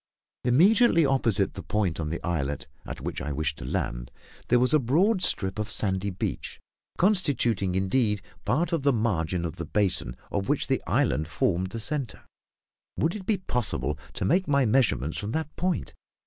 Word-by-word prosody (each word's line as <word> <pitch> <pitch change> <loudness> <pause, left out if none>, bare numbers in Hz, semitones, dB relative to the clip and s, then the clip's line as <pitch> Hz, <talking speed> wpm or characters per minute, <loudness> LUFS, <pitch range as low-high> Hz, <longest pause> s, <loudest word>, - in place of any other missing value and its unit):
Immediately 170 - +5
opposite 115 -8 +1
the - - -7
point 100 -7 -1
on 80 -2 -2
the 85 - -3
islet 75 -5 -2 0.2
at - - -7
which - - -4
I 75 - -4
wished 75 0 -2
to - - -7
land, - - -3 0.4
there 125 - +4
was 125 +4 +3
a 155 - +6
broad 180 - +2
strip 95 - +2
of 105 -1 -3
sandy 95 -1 +2
beach, 90 - -4 0.4
constituting 130 - +2
indeed 105 +1 +1 0.2
part 160 +8 0
of 165 - +1
the 140 0 +3
margin 90 -6 0
of 80 - -5
the - - -4
basin, 90 -12 -1
of 100 -1 -2
which - - +2
the - - 0
islet 75 +1 +1
formed 85 +4 0
the 115 - -6
centre. 135 -1 -3 0.7
Would 165 +2 +1
it 195 -3 -8
be 215 - +2
possible 75 - -1
to - - -3
make 185 +5 +2
my 140 -2 +3
measurements 105 - +1
from 105 +2 -4
that 160 -1 -3
point? 175 - -2
105 Hz, 175 wpm, -26 LUFS, 85-145 Hz, 0.7 s, a